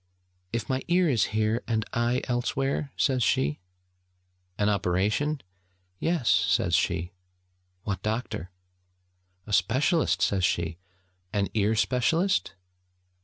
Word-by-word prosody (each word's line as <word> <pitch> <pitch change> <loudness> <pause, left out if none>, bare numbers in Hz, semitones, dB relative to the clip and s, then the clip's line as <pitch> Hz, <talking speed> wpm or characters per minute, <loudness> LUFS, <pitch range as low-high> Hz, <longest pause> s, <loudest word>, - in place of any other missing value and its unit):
'If 115 0 -2
my 130 -1 -1
ear 175 0 +3
is 125 -8 +3
here, 110 +2 0
and 110 -2 0
I 120 +2 +1
elsewhere?' 135 +3 -1
says 130 -3 +2
she. 75 - +1 1.0
'An 105 - +1
operation?' 105 +9 +1 0.6
'Yes!' 165 -8 0
says - - +2
she. 85 +2 +1 0.7
'What 100 -3 -3
doctor?' 110 -4 -3 1.0
'A 105 - -6
specialist!' 130 - +2
says 100 -1 +1
she. 85 -1 0 0.5
'An 100 -2 0
ear 110 +1 +2
specialist?' 125 - +1
110 Hz, 110 wpm, -27 LUFS, 100-130 Hz, 1.0 s, ear